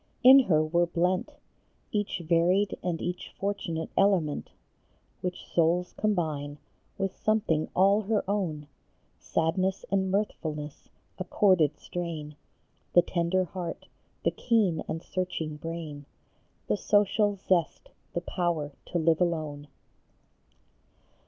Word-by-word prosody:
In 265 +2 +10
her 155 -3 +3
were 170 +2 +2
blent 180 +2 0 0.6
Each 205 -4 -2
varied 180 +4 +3
and 175 -2 -2
each 180 0 -4
fortunate 190 -5 -3
element 185 -7 +2 0.7
Which 180 0 -4
souls 175 +2 +1
combine, 155 -8 -1 0.4
with 195 -1 -2
something 210 -8 +1
all 200 +3 +5
her 215 0 0
own, 175 -7 -1 0.5
Sadness 185 +4 0
and 190 -1 +1
mirthfulness, 155 -7 -3 0.3
a - - -1
chorded 170 -9 +3
strain, 160 -4 -5 0.6
The 175 - +7
tender 175 +1 +1
heart, 175 -1 -6 0.4
the - - +2
keen 210 -9 +1
and 160 +1 -4
searching 180 -4 -3
brain, 155 -3 -6 0.6
The - - 0
social 205 0 +2
zest, 185 -3 -1 0.2
the 175 - -1
power 170 -5 -1 0.2
to 175 - -2
live 165 0 +2
alone. 155 -4 -1
175 Hz, 115 wpm, -28 LUFS, 160-195 Hz, 0.7 s, In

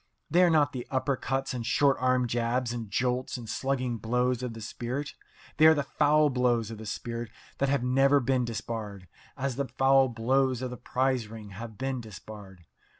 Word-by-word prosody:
They 175 +3 +5
are 180 - +6
not 150 -3 +3
the 125 -2 -5
upper 135 +1 0
cuts 135 +1 -2
and 120 -2 -3
short 135 +4 +3
arm 130 -1 +2
jabs 120 +1 -1
and 115 -3 -5
jolts 125 +5 -1
and 120 -2 -8
slugging 130 -1 -1
blows 125 +2 0
of 125 -3 -4
the 115 - -8
spirit. 125 +6 -4 0.4
They 155 0 +7
are 160 - +7
the 145 - 0
foul 150 +1 +3
blows 120 -3 +1
of 110 - -8
the 110 - -8
spirit 115 +2 -4 0.3
that 140 - +2
have 140 -2 +1
never 135 +3 +4
been 130 -1 +1
disbarred, 110 -4 -5 0.3
as 130 -2 -2
the 140 -1 -1
foul 135 0 +4
blows 130 +2 +1
of 125 - -3
the 125 - -6
prize 130 -1 0
ring 105 -2 -10
have 110 +2 -8
been 130 -1 -2
disbarred. 100 -3 -11
125 Hz, 195 wpm, -28 LUFS, 115-135 Hz, 0.4 s, They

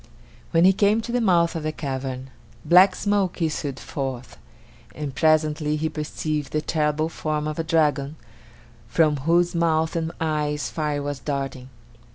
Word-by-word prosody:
When 165 +1 +4
he 190 - +7
came 205 +2 +3
to 230 +2 -6
the 245 0 +1
mouth 170 -6 +3
of 165 - -2
the 155 0 -2
cavern, 130 -3 -5 0.3
black 185 +2 +6
smoke 200 -3 0
issued 150 -4 -2
forth; 130 -3 -5 0.6
and 150 -3 -5
presently 155 -1 +2
he 155 +1 -1
perceived 150 -1 -4
the 155 - +2
terrible 155 0 0
form 155 -2 -3
of 155 +1 -4
a - - 0
dragon, 150 -3 +1 0.7
from 150 +4 +2
whose 170 +5 +2
mouth 160 -1 +1
and 165 -1 -1
eyes 150 -2 -1
fire 150 -2 -2
was 145 -1 -4
darting. 135 -2 -4
155 Hz, 155 wpm, -24 LUFS, 145-165 Hz, 0.7 s, he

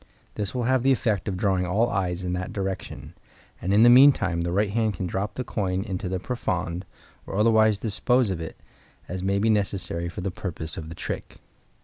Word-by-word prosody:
This 105 +3 -4
will 125 - 0
have 130 +1 +2
the 135 +2 +3
effect 110 -7 0
of 95 -3 -2
drawing 95 -2 +1
all 105 +7 +2
eyes 90 -1 -1
in 90 0 -2
that 90 +1 -3
direction, 95 -1 -5 0.5
and 95 - -1
in 105 +3 +6
the - - +8
meantime 120 -10 +6
the 85 0 -1
right 100 +2 +1
hand 110 -1 0
can 90 - -3
drop 95 +4 -3
the 130 - -3
coin 95 -5 -2
into 95 -3 -4
the 95 0 -2
profonde, 90 -6 -3 0.4
or - - -5
otherwise 110 0 +4
dispose 115 +2 +1
of 85 -3 -3
it 80 - -7 0.5
as 90 0 -4
may 100 +1 +1
be 110 +3 +3
necessary 95 -4 -1
for 85 - -7
the 95 +1 -2
purpose 85 -3 -4
of 80 -1 -7
the 80 - -8
trick. - - -5
95 Hz, 210 wpm, -25 LUFS, 90-110 Hz, 0.5 s, the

